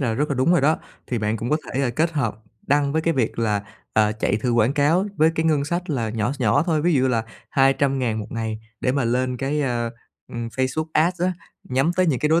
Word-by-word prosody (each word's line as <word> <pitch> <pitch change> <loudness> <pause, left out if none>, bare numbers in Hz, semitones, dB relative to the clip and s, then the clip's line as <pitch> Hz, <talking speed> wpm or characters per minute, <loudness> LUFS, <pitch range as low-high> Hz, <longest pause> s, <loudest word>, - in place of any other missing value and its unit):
là 120 -5 0
rất 150 +6 0
là 140 - 0
đúng 130 +6 +3
rồi 175 - +4
đó. 155 +3 +3 0.3
Thì 120 - -2
bạn 105 +1 0
cũng 115 +3 -4
có 150 - +4 0.2
thể 135 -2 +1
kết 160 +7 0
hợp 125 -9 -1 0.3
đăng 140 0 +2
với 160 - +1
cái 165 0 +1
việc 120 -5 -1
là, 105 -3 +1 0.3
ờ, 110 0 +3
chạy 110 -2 0
thử 120 +3 -1
quảng 115 +2 +3
cáo 160 +7 +2
với 160 +1 +4
cái 160 - 0
ngân 150 -3 +2
sách 175 +3 -3
là 120 -6 -1
nhỏ 110 +2 -1
s 140 - -10
nhỏ 110 +2 +3
thôi, 155 -3 +1
ví 175 +1 +3
dụ 130 - +3
như 130 - +3
là 115 -3 0 0.3
200.000 135 -4 +2
một 105 - -6
ngày 110 -1 -3 0.2
để 125 - +1
mà 140 -3 0
lên 125 +2 0
cái, 140 +3 -1
ơ, 120 -4 -1 0.4
ừm, 120 -1 -5
Facebook 130 +6 -1
Ads 170 +3 +2
á, 185 - +2 0.4
nhắm 135 +5 +2
tới 185 -1 +3
những 135 -6 +1
cái 150 - +1
đối 160 +2 +4
135 Hz, 255 wpm, -23 LUFS, 115-155 Hz, 0.4 s, rồi